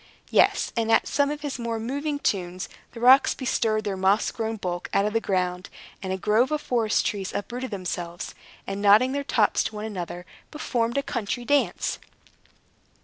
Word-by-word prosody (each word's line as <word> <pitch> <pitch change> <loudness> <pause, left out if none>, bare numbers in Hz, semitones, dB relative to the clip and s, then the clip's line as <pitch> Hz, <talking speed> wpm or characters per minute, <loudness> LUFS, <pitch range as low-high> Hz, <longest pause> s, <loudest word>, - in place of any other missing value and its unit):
Yes, - - +3
and 225 -1 0
at - - +4
some 285 0 +2
of 295 0 -4
his 285 -3 -4
more 230 -1 -2
moving 285 +6 -2
tunes, 185 -7 -2 0.3
the 235 - -8
rocks 255 +3 +6
bestirred 225 -4 0
their 200 -2 -2
moss 190 +2 +2
grown 225 -1 -3
bulk 180 -4 -4
out 200 - +4
of 210 - -1
the 225 - +1
ground, 180 -2 -1 0.3
and 190 -2 -4
a 190 - -1
grove 215 +6 +2
of 305 0 0
forest 235 -6 +1
trees 195 -3 -2
uprooted 250 +5 -4
themselves, 180 -3 -5 0.3
and, 195 +1 -4
nodding 210 +6 +6
their 280 +1 -2
tops 220 -6 +2
to 220 - -4
one 210 +1 -4
another, 180 -4 -5 0.2
performed 240 -5 -1
a 280 - +1
country 240 +1 -3
dance. 285 +1 +1
220 Hz, 180 wpm, -25 LUFS, 195-255 Hz, 0.3 s, rocks